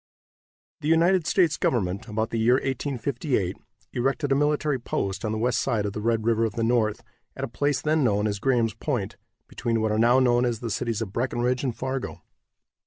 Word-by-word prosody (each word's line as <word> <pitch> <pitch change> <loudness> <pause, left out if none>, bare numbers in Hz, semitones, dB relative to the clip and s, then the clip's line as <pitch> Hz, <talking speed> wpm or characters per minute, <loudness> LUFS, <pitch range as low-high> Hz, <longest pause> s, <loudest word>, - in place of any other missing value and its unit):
The 150 - -4
United 165 +1 +3
States 170 -5 +3
government, 100 -1 -1
about 110 0 -2
the 115 - -1
year 120 +3 +4
1858, 130 - -1 0.4
erected 135 +3 0
a - - +5
military 150 -1 +1
post 100 -4 -3
on 110 - -1
the 110 - -2
west 120 +2 +1
side 115 -6 0
of 100 - -3
the 105 - -4
Red 115 0 0
River 115 -1 +2
of 110 -3 0
the 115 - -2
North, 115 -2 +1 0.3
at 130 - -6
a - - -1
place 140 +2 -1
then 155 -1 +2
known 105 -3 +2
as 100 -2 -1
Graham's 120 -3 +1
Point, - - -3 0.3
between 115 -1 -1
what 110 -1 0
are 110 - +1
now 120 +3 +5
known 120 -1 +3
as 120 -3 0
the 115 -2 -4
cities 115 +2 -1
of 100 -3 -9
Breckenridge 125 +1 0
and 125 -4 -1
Fargo. 130 0 -4
120 Hz, 200 wpm, -25 LUFS, 110-135 Hz, 0.4 s, a